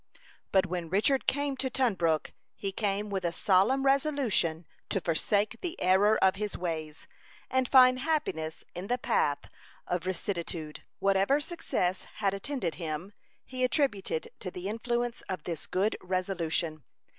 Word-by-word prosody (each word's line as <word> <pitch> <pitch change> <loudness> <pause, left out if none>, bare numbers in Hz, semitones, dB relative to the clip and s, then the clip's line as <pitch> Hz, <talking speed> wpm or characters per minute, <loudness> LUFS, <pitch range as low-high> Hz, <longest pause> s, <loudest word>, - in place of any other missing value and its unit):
But 190 -1 +4
when 175 -2 -4
Richard 215 - +2
came 285 0 +1
to 260 0 -1
Tunbrook, 185 - +1 0.2
he 195 - -3
came 205 0 -1
with 195 -1 -1
a 170 - +1
solemn 205 +10 +3
resolution 270 - +2 0.2
to 195 - 0
forsake 200 +7 0
the 355 0 -4
error 200 +4 +4
of 190 0 +4
his 210 0 -3
ways, 160 -3 -4 0.5
and 260 -1 +1
find 255 -1 +7
happiness 260 - -1
in 180 +3 -6
the 245 - +1
path 145 - 0 0.4
of 180 0 -2
rectitude. 170 -4 -3 0.2
Whatever 195 +8 +3
success 295 - -2
had 200 -2 +1
attended 200 - -2
him, 165 +5 -4 0.3
he 255 0 -3
attributed 250 - 0
to 185 - -4
the 180 +1 -6
influence 240 +2 -2
of 185 - -3
this 165 -3 -4
good 195 +4 +1
resolution. 175 -4 -1
195 Hz, 145 wpm, -30 LUFS, 175-255 Hz, 0.5 s, find